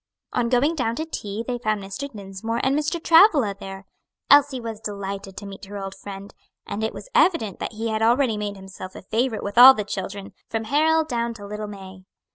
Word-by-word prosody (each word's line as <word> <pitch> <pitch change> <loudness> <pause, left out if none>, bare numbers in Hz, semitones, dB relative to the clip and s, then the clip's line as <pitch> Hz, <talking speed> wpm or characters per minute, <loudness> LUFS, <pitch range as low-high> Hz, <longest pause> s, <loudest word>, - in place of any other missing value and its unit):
On 235 -1 +1
going 260 +6 +3
down 240 -7 -1
to 315 - -3
tea 215 -8 -5
they 245 -1 -2
found 215 -3 0
Mr. 270 +9 -6
Dinsmore 205 +2 -5
and 265 +1 +2
Mr. 305 +3 -1
Travilla 325 - +5
there. 195 0 -8 0.5
Elsie 285 -2 +6
was 225 -2 -6
delighted 200 -2 -6
to 205 - -7
meet 195 0 -9
her 205 +1 -8
old 195 -1 -5
friend, 200 0 -9 0.3
and 215 - -4
it 220 - 0
was - - -11
evident 330 - +2
that - - -4
he 225 +1 -3
had 220 0 -1
already 235 +1 +3
made 205 -1 -4
himself 190 -1 -10
a - - -10
favorite 225 +3 -1
with 205 +3 0
all 260 +2 +11
the 210 - -2
children, 200 0 -6 0.2
from 225 -1 -2
Harold 315 +6 +2
down 235 -3 -2
to 205 -2 -10
little 210 +1 -5
May. 190 -2 -11
220 Hz, 210 wpm, -23 LUFS, 200-260 Hz, 0.5 s, all